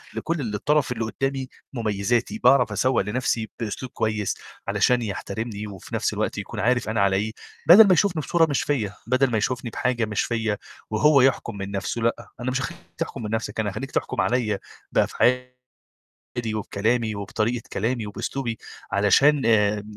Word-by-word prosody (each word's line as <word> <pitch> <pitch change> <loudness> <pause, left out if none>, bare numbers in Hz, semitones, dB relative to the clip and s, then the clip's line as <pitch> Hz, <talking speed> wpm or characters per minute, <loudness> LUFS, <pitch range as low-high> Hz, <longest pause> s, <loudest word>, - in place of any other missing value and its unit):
لكل 140 -11 -2
الطرف 145 +4 +1
اللي 115 -2 -2
قُدّامي 135 +4 -2 0.3
مُميّزاتي، 115 - 0
باعرف 135 -8 +5
أسوّق 130 -1 +2
لنَفْسي 110 +1 -1
بأسلوب 115 +2 -4
كويس 110 -3 -1 0.3
علشان 125 -1 +3
يحترمني 105 0 -4
وفي 95 -3 -8
نَفْس - - 0
الوقت - - -2
يكون - - -5
عارف 120 +2 +1
أنا 110 -2 +1
على 100 -1 +3
إيه، 110 +2 -1 0.4
بَدَل 200 +5 +10
ما 190 - +6
يشوفني 175 -2 +2
بصورة 165 +2 +3
مش 140 - +1
فيّا، 110 -9 -1
بَدَل 130 +1 +2
ما 110 - +2
يشوفني 125 +3 -1
بحاجة 120 -1 0
مش 105 -2 -1
فيّا، 110 -3 -1 0.3
وهو 135 +6 +5
يحكُم 125 -4 +1
من 100 0 -5
نَفْسه، 100 +4 -3
لأ. 115 +1 -1
أنا 125 +1 -2
مش 130 +1 -1
هاخلّيك 110 - -5 0.2
تحكُم - - -4
من 105 - -4
نَفْسك، 110 -1 -2
أنا 105 -2 0
هاخلّيك 135 +7 -6
تحكُم - - -1
عليّا 110 -5 +1 0.3
بأفعالي 125 0 +2 1.0
وبكلامي 110 +2 0
وبطريقة 110 +4 -2
كلامي 115 +1 -1
وبأسلوبي 115 +3 -3 0.3
علشان 135 +9 +4
آآ 105 -2 +3
115 Hz, 160 wpm, -24 LUFS, 105-130 Hz, 1.0 s, بَدَل